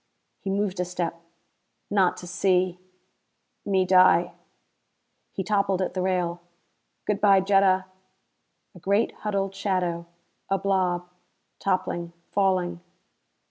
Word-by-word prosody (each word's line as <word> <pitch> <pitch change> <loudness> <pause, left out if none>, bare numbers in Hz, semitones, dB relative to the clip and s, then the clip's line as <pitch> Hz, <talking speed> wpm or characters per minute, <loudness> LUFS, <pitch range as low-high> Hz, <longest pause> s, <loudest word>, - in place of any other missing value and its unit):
He 195 - -5
moved 195 -1 -1
a - - +2
step. 175 -2 -4 0.7
"Not 195 -3 +3
to 180 - -9
see 180 0 +1 0.8
me 190 -2 +2
die 185 -1 +5 0.5
" - - -49
He 190 - -2
toppled 200 -2 +1
at 185 - -1
the 185 - -2
rail. 180 -2 -1 0.6
"Good 210 0 -1
by, 200 -2 +6
Jetta." 190 -1 +3 0.9
A 180 - -13
great 200 +5 +1
huddled 195 -2 -2
shadow. 180 -4 -1 0.4
A 195 - +2
blob, 185 -2 0 0.5
toppling, 175 -3 -1 0.2
falling.... 185 -3 +1
185 Hz, 115 wpm, -25 LUFS, 180-195 Hz, 0.9 s, by